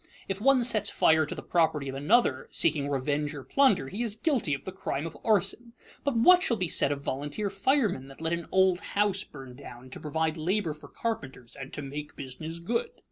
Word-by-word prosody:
If 195 +1 -3
one 265 0 +5
sets 215 -4 +1
fire 160 -1 +3
to - - -5
the - - -7
property 160 -5 +1
of 135 - -4
another, 145 - +2
seeking 145 -3 +1
revenge 145 +2 -1
or 140 - -7
plunder, 260 - +3
he 200 - -5
is 225 -3 -1
guilty 235 - +1
of 135 - -10
the 190 - -4
crime 160 -5 -3
of 165 - -6
arson. 220 +3 +1 0.3
But 280 -4 0
what 360 +11 +7
shall 235 -9 +1
be 185 -2 -1
said 140 - +2
of 140 -1 -2
volunteer 145 +11 -3
firemen 200 - +1
that 135 - -13
let 160 +1 -1
an 170 0 -3
old 190 -1 +3
house 200 -2 +1
burn 135 -3 -11
down 130 -2 -11
to - - -7
provide 160 +1 -1
labor 175 +1 0
for 150 - -13
carpenters 130 - -5
and 135 0 -8
"to 145 - -5
make 145 +2 -7
business 155 +5 -7
good"? 225 +8 -1
165 Hz, 210 wpm, -28 LUFS, 140-210 Hz, 0.3 s, what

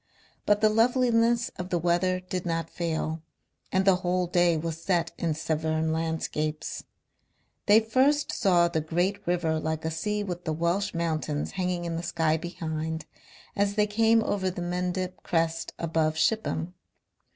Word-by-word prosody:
But 205 0 +3
the 215 - +5
loveliness 235 +1 +3
of 180 0 -4
the 175 - +1
weather 175 +2 +1
did 185 -1 -4
not 165 -1 -2
fail, 160 -1 -2 0.5
and 190 0 +2
the 190 -2 +5
whole 180 0 0
day 175 -1 +3
was 165 +1 -4
set 175 -2 0
in 165 -3 0
Severn 160 0 -1
landscapes. 160 -1 -2 0.8
They 205 +2 +8
first 265 +6 +2
saw 180 -5 +3
the 160 -2 -1
great 175 +6 0
river 170 -3 +1
like 160 0 -3
a 160 - -1
sea 210 +6 -2
with 180 -3 -5
the 160 - -1
Welsh 170 +5 0
mountains 155 -3 -1
hanging 180 -2 -2
in 165 -1 -2
the - - -3
sky 165 -2 +1
behind 160 -1 -4 0.5
as 200 0 +1
they 210 -1 +3
came 225 +2 +3
over 190 -3 0
the 180 -1 -5
Mendip 180 0 -2
crest 165 -1 -1
above 160 -1 0
Shipham. 180 -4 0
175 Hz, 155 wpm, -27 LUFS, 160-195 Hz, 0.8 s, They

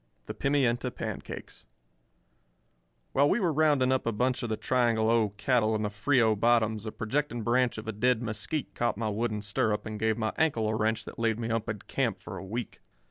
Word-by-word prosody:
V - - -42 0.2
THE - - -5
PIMIENTA 135 -4 +1
PANCAKES - - -7 1.5
While 140 +2 +4
we - - +2
were 175 -6 +1
rounding 145 -4 +3
up 130 -2 0
a - - +2
bunch 125 +4 0
of 120 - -3
the 110 - -1
Triangle 115 -3 +2
O 115 -2 +3
cattle 110 -1 +2
in 110 - -1
the 105 - -1
Frio 115 0 +3
bottoms 110 -1 +2
a - - -3
projecting 120 +1 -2
branch 125 +1 +2
of 110 - -7
a - - -1
dead 120 +3 +2
mesquite 115 +7 -3
caught 120 -3 0
my 110 -1 -1
wooden 105 0 -2
stirrup 105 +1 0
and 110 -1 -5
gave 110 0 +1
my 110 -1 -1
ankle 140 -9 +2
a 110 - 0
wrench 110 0 0
that - - -9
laid 115 -1 +1
me 115 0 -3
up 115 0 -1
in 105 - -2
camp - - 0
for - - -8
a - - -8
week. 115 +5 -5
115 Hz, 210 wpm, -29 LUFS, 110-125 Hz, 1.5 s, While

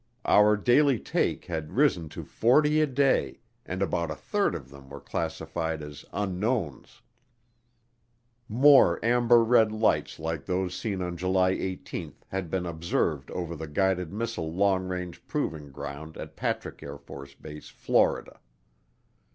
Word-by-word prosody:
Our 105 +1 +5
daily 130 +5 +4
take - - -1
had 80 -3 -5
risen 115 - +2
to - - -7
forty 150 +6 +3
a 155 - +3
day, 135 0 +1 0.3
and 95 +2 -2
about 85 -3 -1
a - - -3
third - - 0
of 65 - -8
them 70 -1 -14
were 70 0 -8
classified 80 +1 -3
as 75 -1 -9
unknowns. 100 - -3 1.5
More 135 +5 +6
amber 120 0 +5
red 115 -1 +4
fights 110 +1 0
like 80 -2 -4
those 90 -1 -1
seen 95 -1 -3
on 90 -1 -4
July 95 +1 +2
18 95 0 -5
had 95 -3 -3
been 90 +1 -2
observed 80 -4 -1
over 85 -2 -4
the 80 +1 -6
Guided 90 +2 0
Missile 110 -6 -3
Long 95 +1 +1
Range 90 -2 -5
Proving 75 -3 -3
Ground 70 +3 -8
at - - -8
Patrick - - -3
AFB, 70 +1 -10
Florida. - - 0
90 Hz, 135 wpm, -27 LUFS, 80-110 Hz, 1.5 s, More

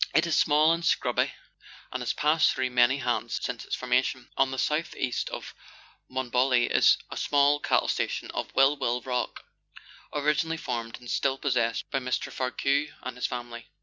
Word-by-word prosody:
It 160 - +5
is 170 - 0
small 155 +2 +4
and 170 0 -3
scrubby, - - +1 0.6
and 130 - -4
has 120 - -1
passed 155 +1 +3
through 130 -1 -1
many 125 +2 +4
hands 135 - -1
since - - -4
its - - -2
formation. 125 0 -1
On 135 - +3
the 130 - -5
south 155 +5 -1
east 125 -2 -2
of - - -7 0.6
Monbolloc 130 -1 +1
is - - +5
the - - -5
small 145 0 +3
cattle - - +1
station - - -2
of - - -4
Will 135 +2 +5
Will 125 -3 -1
Rook, 125 -1 -3 0.7
originally 150 +2 0
formed 115 -6 -4
and 125 - -13
still 135 +2 0
possessed 120 -5 0
by 135 - +1
Mr. 125 -1 -2
Varcoe 135 +3 0 0.2
and 130 - -5
his 125 - -1
family. 120 -2 -7
130 Hz, 175 wpm, -27 LUFS, 125-145 Hz, 0.7 s, It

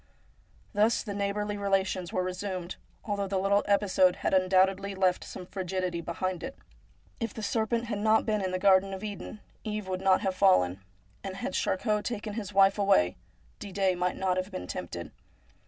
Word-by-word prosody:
Thus 215 +3 +3
the 205 - -5
neighbourly 205 +1 -2
relations 190 -3 0
were 185 - 0
resumed, 185 -1 -4 0.3
although 200 -2 -1
the 195 0 -1
little 200 +2 +3
episode 195 -3 +3
had - - -2
undoubtedly 190 +1 +3
left 185 -1 +2
some 180 - -8
frigidity 185 -2 -3
behind 180 +1 -3
it. 270 - -6 0.6
If 230 -3 -3
the 220 - -6
serpent 230 +1 0
had 215 -3 -3
not 220 +1 +3
been 215 -1 0
in 185 - 0
the 185 - -1
garden 195 0 +4
of 190 - -9
Eden, 205 0 -6 0.2
Eve 210 -2 -4
would 185 0 -3
not 190 -1 +4
have 190 -1 0
fallen; 100 - +3 0.4
and 190 -1 -5
had 265 +6 -4
Charcot 210 +2 0
taken 215 -3 -4
his 205 -2 -5
wife 195 +1 +4
away 95 - +3 0.4
Didet 195 -2 0
might 180 +1 -1
not 185 -1 0
have 185 +1 -2
been 90 - -6
tempted. - - -6
195 Hz, 175 wpm, -29 LUFS, 185-205 Hz, 0.6 s, garden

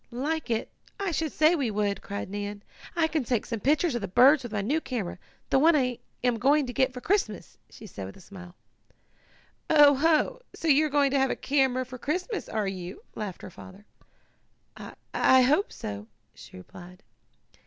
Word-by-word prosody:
"Like 285 +5 -3
it! 225 -1 -2 0.3
I 395 -3 -1
should 320 -2 -2
say 310 +2 +4
we 280 -8 0
would!" 205 -1 -1
cried 200 0 -5
Nan. 205 +1 -6 0.3
"I 335 -2 +3
can 315 -3 -1
take 240 -2 -1
some 230 -2 -4
pictures 295 - +1
of 240 - -2
the 200 - -3
birds 260 +9 +5
with 240 -3 -8
my 210 -2 -1
new 295 +10 0
camera 215 - -4 0.3
the 270 - +4
one 320 +3 +5
I 250 -4 0 0.2
am 245 -2 +1
going 285 +4 +3
to 245 - -6
get 260 0 +2
for 250 -1 -9
Christmas," 400 +8 -2
she 220 - -13
added 100 - -8
with 95 - -12
a - - -15
smile. 180 -1 -12 1.1
"Oh 295 -2 +7
ho! 320 - +1
So 330 - -5
you 305 +1 +4
are - - -7
going 285 -1 +2
to 275 - +2
have 265 0 +2
a - - -1
camera 265 -2 +1
for 255 0 -10
Christmas; 365 - -3
are 215 -2 -1
you?" 185 -1 -7
laughed 205 -4 -6
her - - -8
father. 190 +4 -13 0.9
"I - - -10 0.2
I 260 0 +5
hope 300 +11 +2
so," 100 +1 -7 0.3
she - - -13
replied. 180 - -13
255 Hz, 195 wpm, -27 LUFS, 205-300 Hz, 1.1 s, Oh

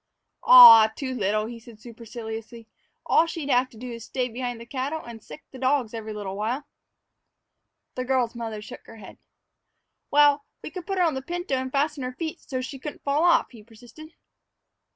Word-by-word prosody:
"Ah, 230 - +10
too 260 -2 -4
little," 215 -2 -1
he 230 +1 -8
said 230 -1 -16
superciliously. 225 0 -9 0.4
"All 330 - +3
she'd 305 -4 -4
have 255 +1 +2
to 235 - -17
do 250 +2 -8
is 230 -1 -8
stay 250 +2 -3
behind 245 0 -5
the 235 - -10
cattle 275 +5 -4
and 230 -2 -10
sick 305 - -13
the 260 - -11
dogs 260 -3 0
every 220 -1 -6
little 205 -2 -6
while." 225 +7 -2 1.3
The 255 - -4
little 255 - -6
girl's 245 -3 0
mother 225 -3 -6
shook - - -12
her - - -12
head. 205 - -13 0.9
"Well, 290 0 +4 0.2
we - - -7
could 365 -2 -9
put 390 -1 -2
her 365 - +3
on 325 -3 +1
the 265 - -4
pinto 350 +1 -5
and 260 0 -2
fasten 290 +1 -1
her 255 0 -4
feet 320 +3 -6
so's 255 -1 -5
she 270 0 -9
couldn't 295 +3 -8
fall 285 +3 0
off," 350 -1 +3
he 230 -4 -14
persisted. 245 +8 -15
255 Hz, 195 wpm, -25 LUFS, 225-285 Hz, 1.3 s, Ah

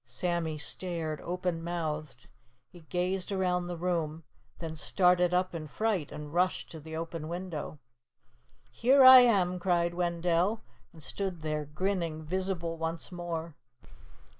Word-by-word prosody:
Sammy 160 +5 -2
stared 160 -1 -4
open 180 -2 -2
mouthed. 155 -6 -4 0.4
He 175 - -13
gazed 180 +2 -1
around 180 -2 0
the 175 -1 -4
room, 165 -2 -2 0.3
then 160 -2 -6
started 180 +2 +3
up 180 0 +1
in 160 -2 -5
fright 200 -2 -1
and 150 0 -8
rushed 180 +1 0
to 160 - -8
the 160 +1 -8
open 165 -1 -5
window. 170 -3 -5 0.9
"Here 260 - +5
I 260 0 +12
am," 190 -7 +3
cried 175 -1 +1
Wendell, 175 +4 0 0.3
and 160 -4 -13
stood 190 -2 -4
there 155 -1 -2
grinning, 165 0 -2
visible 175 -1 -2
once 165 +2 -4
more. 170 -2 -5
175 Hz, 135 wpm, -30 LUFS, 160-180 Hz, 0.9 s, I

